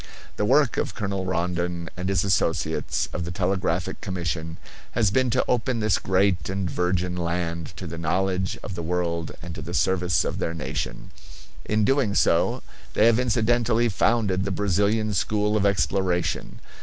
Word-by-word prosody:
The 105 - 0
work 135 +3 +3
of - - -2
Colonel 100 -3 -2
Rondon 85 -1 -1
and 90 +1 -3
his 95 -4 +2
associates 95 -4 0
of 85 - -2
the 85 - -4
Telegraphic 90 -1 -1
Commission 85 -3 -3 0.4
has 110 -5 +2
been 130 +3 +2
to 130 +2 +1
open 125 0 +1
this 110 -2 +2
great 95 0 +1
and 95 -1 -1
virgin 90 +1 0
land 85 -1 -3
to 90 - -6
the 85 0 -6
knowledge 95 +3 0
of 100 - -5
the 85 - -4
world 85 -1 -2
and 85 0 -6
to - - -7
the - - -5
service 90 -1 +2
of - - -3
their 85 - -2
nation. 80 - -4 0.5
In 105 0 +1
doing 135 -6 +2
so - - +2 0.3
they 110 - +5
have 115 0 +5
incidentally 120 -1 +2
founded 100 -2 +1
the 100 - -2
Brazilian 105 +3 +1
school 105 +3 +1
of 100 -1 +3
exploration. 95 -3 0
95 Hz, 165 wpm, -25 LUFS, 90-105 Hz, 0.5 s, they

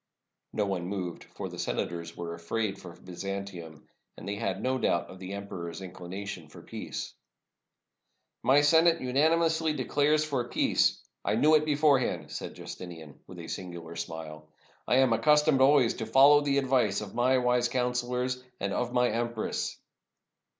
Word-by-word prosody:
No 105 - 0
one 95 -3 -2
moved, 90 -3 -4
for - - -7
the - - -9
senators 85 -1 -3
were 85 -1 -5
afraid 95 +5 -3
for 85 -2 -10
Byzan 95 +2 -5
tium, 85 -5 -10 0.3
and - - -9
they 100 - -2
had 100 -2 -2
no 130 0 0
doubt 85 -6 0
of 95 - -12
the 95 +1 -6
emperor's 95 -4 -6
inclina 95 +1 -7
tion 85 -6 -6
for 75 - -14
peace. - - -6 1.3
"My 140 +2 +5
Senate 165 +3 +5
unanimously 160 +4 +2
declares 150 +2 +1
for 130 -5 -2
peace. - - +2 0.2
I - - +1
knew 155 +2 +4
it 155 0 +5
beforehand," 145 -3 +2
said - - -6
Justinian, 80 -5 -9
with 90 - -11
a 85 -1 -8
singular 85 -3 -7
smile. 80 -2 -7 0.4
"I - - +3
am 130 -2 +4
accustomed 150 +4 +4
always 135 -3 +5
to 110 - -5
follow 140 +5 +7
the 140 -1 +1
advice 130 -7 +2
of 100 -2 -8
my 125 +2 +3
wise 125 -1 +2
counselors 125 0 -1
— 125 - -43
and 100 0 -2
of 125 -1 -1
my 125 0 +3
empress." 120 -1 -2
115 Hz, 165 wpm, -29 LUFS, 90-135 Hz, 1.3 s, follow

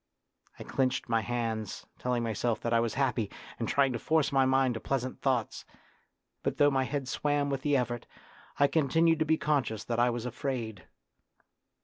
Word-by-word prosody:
I - - -7
clenched 130 -2 0
my 115 -1 +2
hands, 115 -2 -3
telling 125 -1 0
myself 115 0 -1
that 115 - -1
I 115 - +5
was 115 -2 -1
happy, 125 -6 0 0.3
and - - -1
trying 135 -2 +3
to 120 - -3
force 160 +2 +2
my 135 -1 +4
mind 130 -1 +3
to 115 - -4
pleasant 130 +1 -3
thoughts; 125 -5 0 0.8
but - - -2
though 145 0 +5
my 135 -1 +1
head 140 -1 -3
swam 145 0 0
with 135 -1 -2
the 145 0 +2
effort, 120 -2 -2 0.5
I 140 - +5
continued 160 +2 +3
to 160 - +2
be 160 +1 +3
conscious 125 -9 0
that 120 -1 -2
I 120 +1 +4
was 120 0 -3
afraid. 120 -5 -4
130 Hz, 185 wpm, -30 LUFS, 115-140 Hz, 0.8 s, I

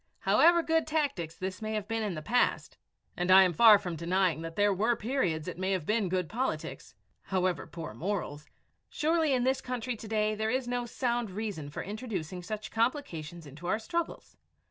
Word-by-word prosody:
However 340 0 +5
good 325 0 +1
tactics 280 - -1
this 190 +2 -5
may 215 0 -3
have 210 -1 -3
been 225 +1 -1
in 205 -5 -2
the 155 - -6
past, 245 +7 +1 0.4
and 180 +1 -2
I 190 +1 +9
am 180 -2 +2
far 215 +4 +8
from 180 -4 -5
denying 170 0 +1
that 165 0 -6
there 205 0 +3
were 220 +5 +2
periods 195 - -1
it - - -6
may 190 +1 0
have 180 -5 -2
been 210 -1 +1
good 180 -2 0
politics, 250 +8 -4 0.3
however 185 -2 0
poor 165 -2 -7
morals, 165 -6 -4 0.4
surely 320 0 +1
in 255 -2 +2
this 260 +1 +1
country 250 -1 -3
to 215 - -9
day 215 0 +1
there 220 +1 -1
is 255 +1 -1
no 245 0 -2
sound 240 -2 -1
reason 190 -7 -5
for 145 - -5
introducing 195 -5 -5
such 215 +4 -6
complications 175 - -2
into 150 +5 -9
our 190 - +2
struggles. 335 +9 -4
210 Hz, 190 wpm, -30 LUFS, 180-245 Hz, 0.4 s, I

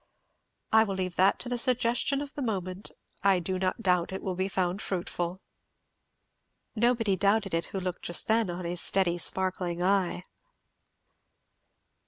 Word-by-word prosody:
"I 220 0 +6
will 200 -3 -3
leave 185 -2 -3
that 190 +2 +4
to - - -3
the 245 0 0
suggestion 250 +3 +2
of 290 0 -7
the 290 - -5
moment. 190 -4 -3 0.3
I 195 -1 +4
do 185 +1 -2
not 185 +4 -1
doubt 180 -2 +2
it 190 - -5
will 190 - -2
be 185 +1 -1
found 185 0 -1
fruitful." 175 0 -3 1.3
Nobody 230 -3 +2
doubted 200 +1 +1
it 165 0 0
who 195 - -5
looked 185 -1 -4
just 175 - +2
then 225 -2 +2
on 175 0 -5
his 175 0 -2
steady 175 -3 +1
sparkling 180 -1 -1
eye. 185 -2 +1
190 Hz, 155 wpm, -28 LUFS, 180-220 Hz, 1.3 s, I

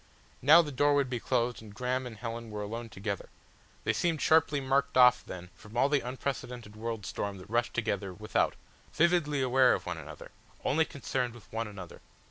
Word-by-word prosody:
Now 155 +6 +8
the 150 - -5
door 145 +2 +3
would 140 -2 +1
be 120 - -1
closed 120 0 0
and 105 -2 -12
Graham 125 +1 -1
and 115 -3 -9
Helen 115 0 -5
were 105 -1 -4
alone 115 +3 -5
together; 100 -1 -5 0.5
they - - +1
seemed 165 -3 0
sharply 155 -2 +4
marked 135 0 +1
off 125 -1 +7
then 90 0 -9
from 110 +2 -11
all 135 +3 +4
the 145 -1 +3
unprecedented 125 -3 -5
world 110 -1 -4
storm 100 -1 -3
that 95 +3 -12
rushed 120 +1 0
together 110 -4 -1
without, 105 +4 0 0.4
vividly 155 -5 +2
aware 130 0 +5
of - - -7
one 90 -2 -4
another, 75 -1 -10 0.3
only 160 +4 +3
concerned 125 -4 -3
with 110 -3 -16
one 115 0 -2
another. 95 -4 -10
120 Hz, 190 wpm, -30 LUFS, 105-135 Hz, 0.5 s, Now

